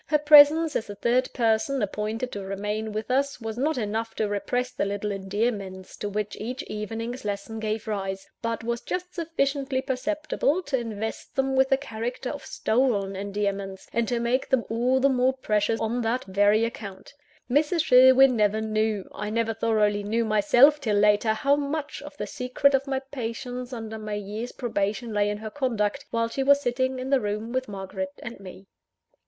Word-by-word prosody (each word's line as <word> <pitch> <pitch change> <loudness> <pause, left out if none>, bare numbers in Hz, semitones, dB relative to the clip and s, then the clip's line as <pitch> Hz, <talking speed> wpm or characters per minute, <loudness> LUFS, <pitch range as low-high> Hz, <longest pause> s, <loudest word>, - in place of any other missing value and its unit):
Her 300 - +3
presence, 300 +1 +7
as - - -1
the 205 - -7
third 245 +5 +1
person 235 +3 +1
appointed 215 +4 -3
to 205 - -5
remain 210 +3 -3
with 215 +3 -4
us, 275 +1 +1
was 225 -2 -5
not 290 +5 0
enough 225 0 -2
to 215 - 0
repress 245 +5 -2
the 250 - -2
little 205 +1 -2
endearments 195 -1 -3
to 205 - -3
which 210 0 -3
each 250 +4 -4
evening's 225 +4 -5
lesson 205 +2 -4
gave 215 0 -3
rise; 195 -2 -3
but 230 -1 -2
was 235 0 -2
just 360 0 -4
sufficiently 275 -5 -1
perceptible 300 +5 -1
to 280 -5 -1
invest 220 -1 -5
them 270 0 +1
with 265 0 +4
the 270 - +4
character 245 0 -4
of 285 - -7
stolen 220 -5 0
endearments, 200 -1 -3
and 235 0 +1
to 240 -1 0
make 240 +3 0
them 265 -3 +2
all 245 +3 +2
the 270 - +4
more 260 -1 +2
precious 215 -3 0
on 230 +2 -1
that 235 +2 0
very 205 +3 +3
account. 205 -3 -8 0.3
Mrs. 300 +5 +2
Sherwin 260 +1 +7
never 210 -1 +2
knew, 215 -2 -1
I 210 +1 -4
never 225 +1 0
thoroughly 210 -2 +1
knew 225 +3 0
myself 240 +8 +5
till 215 -6 +1
later, 210 +1 +4
how 275 +6 +2
much 290 +1 -3
of - - -11
the - - -3
secret 275 +1 +1
of 270 +1 +1
my 265 -1 -1
patience 250 0 -5
under 220 -2 -6
my 215 -1 -4
year's 210 +4 -5
probation 215 -1 -2
lay 205 0 +2
in 205 - -2
her 215 0 -7
conduct, 250 -2 -1
while 230 0 0
she 250 +4 -3
was 280 +1 +5
sitting 260 0 -1
in 255 +1 -4
the 270 -2 +4
room 210 +2 -3
with 260 0 -1
Margaret 190 -1 -5
and 235 -2 -7
me. 190 0 -11
230 Hz, 185 wpm, -26 LUFS, 210-260 Hz, 0.3 s, presence